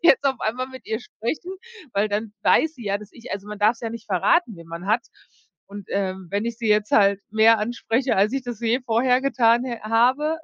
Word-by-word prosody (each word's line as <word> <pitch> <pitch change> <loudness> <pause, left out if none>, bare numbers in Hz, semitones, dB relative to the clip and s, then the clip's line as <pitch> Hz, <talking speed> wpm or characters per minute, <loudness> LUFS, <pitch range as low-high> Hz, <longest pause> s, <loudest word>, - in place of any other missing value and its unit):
jetzt 285 -4 +5
auf 265 -2 +2
einmal 255 +4 -2
mit 260 0 -12
ihr 220 +1 -2
sprechen, 245 - -5 0.4
weil 205 +2 +1
dann 210 +1 -3
weiß 320 0 +3
sie 235 - -10
ja, 200 0 0
dass 210 -1 -13
ich 230 - -10
also 200 +1 -6
man 210 -1 -7
darf 215 +3 +3
's - - -18
ja 225 -1 -4
nicht 230 -1 -9
verraten, 215 - +2
wen 165 0 -13
man 170 +3 -7
hat. 225 +3 +2 0.6
Und, 200 -1 -10
ähm, 190 -1 -2
wenn 205 +2 -1
ich 235 -1 -3
sie 225 -2 -2
jetzt 210 0 +2
halt 200 -1 +4
mehr 220 +1 +5
anspreche, 240 +3 -1
als 205 +4 +3
ich 270 -1 -2
das 240 -3 -7
je 235 +3 +1
vorher 250 +2 +2
getan 240 -3 +3
hä 240 -3 -4
habe, 255 +8 +2
225 Hz, 230 wpm, -23 LUFS, 205-250 Hz, 0.6 s, jetzt